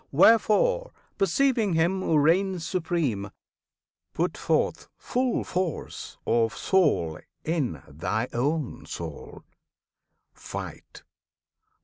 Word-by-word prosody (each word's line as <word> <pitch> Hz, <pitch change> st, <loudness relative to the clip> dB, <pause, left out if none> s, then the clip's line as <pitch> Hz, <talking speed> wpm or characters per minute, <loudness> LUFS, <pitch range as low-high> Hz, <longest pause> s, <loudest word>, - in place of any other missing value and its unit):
Wherefore, 230 Hz, -, +4 dB, 0.3 s
perceiving 265 Hz, -, +2 dB
Him 170 Hz, +4 st, +2 dB
who 160 Hz, -, +2 dB
reigns 175 Hz, +3 st, +2 dB
supreme, 160 Hz, -, -1 dB, 0.9 s
Put -, -, 0 dB
forth -, -, 0 dB
full 250 Hz, 0 st, 0 dB
force 180 Hz, -3 st, -4 dB
of 115 Hz, -1 st, +1 dB
Soul 145 Hz, -, +2 dB, 0.3 s
in 140 Hz, -, -1 dB
thy 95 Hz, -, -2 dB
own 140 Hz, +3 st, -1 dB
soul! 80 Hz, -4 st, -7 dB, 0.9 s
Fight! -, -, -8 dB
165 Hz, 85 wpm, -26 LUFS, 120-195 Hz, 0.9 s, Wherefore